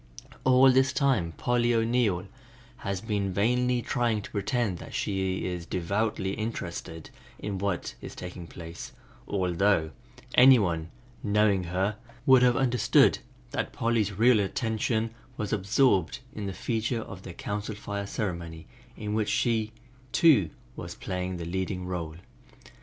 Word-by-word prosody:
All 130 +1 +6
this 130 +1 +3
time 125 - +1
Polly 120 +5 +1
O'Neill 115 -5 +1 0.5
has 100 -4 -3
been 105 -3 -1
vainly 125 +5 +1
trying 120 -5 0
to - - -10
pretend 105 -2 -1
that - - -9
she 95 -2 -1
is 90 -2 -4
devoutly 95 +3 -1
interested 85 -7 -5 0.3
in 100 -2 -4
what 100 -2 -2
is - - -8
taking 90 -1 -8
place, 85 0 -9 0.3
although 90 -3 +1 0.4
any 130 +1 +8
one 85 -6 -1 0.3
knowing 100 -3 +2
her 95 +5 -1 0.3
would 130 -1 +7
have 125 -1 +4
understood 125 -4 +4 0.3
that - - -2
Polly's 115 -3 +1
real 115 +3 +5
attention 110 +2 -1 0.3
was 105 -1 -2
absorbed 100 -2 +2 0.2
in 105 -4 -5
the - - -2
feature 115 +3 -2
of 95 -3 -9
their 90 - -9
Council 105 +4 -4
Fire 100 -1 -5
ceremony 85 -6 -4 0.3
in 105 -1 -4
which 110 -1 0
she 110 -2 +1 1.0
was - - -6
to - - -19
play 90 0 -3
the 85 -2 -5
leading 90 +1 -3
role. 85 -4 -4
105 Hz, 135 wpm, -28 LUFS, 90-115 Hz, 1.0 s, any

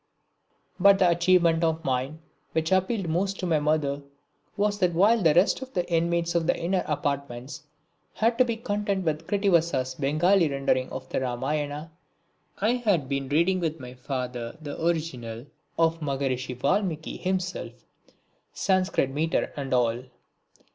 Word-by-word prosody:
But 200 0 +7
the 185 - +4
achievement 170 -1 +3
of 160 0 0
mine 135 +4 -2 0.3
which 160 +1 0
appealed 190 +1 +1
most 190 +4 -1
to 185 - -2
my 165 -3 +2
mother 145 -2 0 0.6
was 205 0 +1
that 180 -3 +1
while 210 +6 +4
the 160 -4 +4
rest 180 +8 +3
of 265 0 -8
the 180 -1 0
inmates 170 +1 +1
of 170 -1 0
the - - +2
inner 180 +2 0
apartments 140 -1 -3 0.5
had 230 +2 +1
to - - +8
be 235 -2 -1
content 205 -4 -2
with 155 0 -2
Krittivasa's 170 -10 +1
Bengali 155 +6 +2
rendering 135 -2 0
of 130 0 -7
the - - -1
Ramayana, 145 +5 -3 0.7
I 215 +4 +2
had 200 - +1
been 140 -1 -2
reading 170 +6 +2
with 165 -2 -2
my 125 -1 -9
father 125 0 -5
the 150 0 -6
original 130 -9 -2 0.3
of 165 0 +2
Maharshi 135 -3 -2
Valmiki 160 +3 -1
himself, 185 -9 -3 0.8
Sanscrit 185 -8 +1
metre 155 +4 -1
and 140 -2 -5
all. 120 0 +1
160 Hz, 145 wpm, -26 LUFS, 140-185 Hz, 0.8 s, to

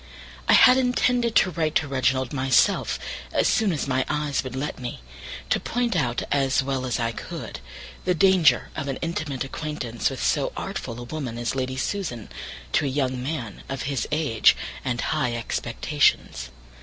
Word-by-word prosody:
I - - +7
had 255 +2 +8
intended 245 -2 +2
to 185 - +5
write 160 -2 -1
to 155 - +2
Reginald 130 -1 0
myself 130 -1 +2 0.3
as - - +2
soon 215 -3 +2
as 150 -4 -2
my 130 -1 +1
eyes 150 -2 0
would 130 -1 -6
let 135 +1 -3
me, 125 -1 -5 0.5
to - - +3
point 240 -3 -1
out, 125 -8 0
as 135 -1 +2
well 130 -1 -2
as 125 - -1
I 115 -1 0
could, 115 - -7 0.4
the 180 - +1
danger 185 -2 +4
of 140 - -3
an 135 - -2
intimate 155 -5 -2
acquaintance, 135 -4 -3
with - - -5
so - - +1
artful 115 +1 -5
a - - -6
woman 125 -2 -5
as 120 0 -2
Lady 130 0 -2
Susan, 130 - -3 0.4
to - - +2
a - - +1
young 130 -2 -1
man 125 -7 -4
of 135 0 -3
his 140 -2 -2
age, 150 -8 +4 0.3
and 125 -2 -1
high 125 -6 0
expectations. 115 - 0
135 Hz, 170 wpm, -25 LUFS, 125-155 Hz, 0.5 s, had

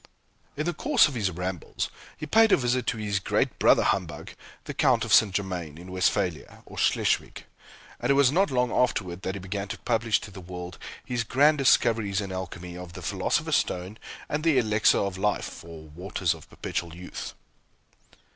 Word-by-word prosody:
In 150 - -1
the 175 - 0
course - - +4
of 145 - -6
his 105 -6 0
rambles, 90 0 -4 0.3
he - - -5
paid 225 +5 +5
a - - +6
visit 125 -1 0
to 115 - 0
his 105 -2 -1
great - - 0
brother - - +5
humbug, 90 -5 -2 0.3
the - - -6
Count - - +2
of - - 0
St. 110 -3 +6
Germain, 90 -6 -3
in 90 +2 -10
Westphalia, 90 -2 -1
or - - -9
Schleswig, - - 0 0.5
and 120 - -2
it 140 - +5
was 140 -2 +5
not 190 +6 +3
long 125 -2 +1
afterward 95 -7 0
that 95 +1 -3
he - - -5
began 100 +2 -4
to - - -5
publish 115 -2 +1
to 100 - -9
the 95 - -10
world 90 0 -8 0.3
his 120 -2 -1
grand 145 +6 +3
discoveries 115 -6 +3
in 100 -2 -4
Alchemy, 90 -1 -6
of 90 -1 -9
the - - -9
Philosopher's - - +1
Stone, 90 +4 -3 0.3
and 150 +1 -2
the 160 -4 +3
Elixir 110 -3 +3
of 100 -1 -2
Life, 105 +1 -2
or 80 -1 -10
Waters 90 +2 -2
of 80 -2 -14
Perpetual 85 -1 -4
Youth. 90 +1 -7
100 Hz, 185 wpm, -26 LUFS, 90-120 Hz, 0.5 s, a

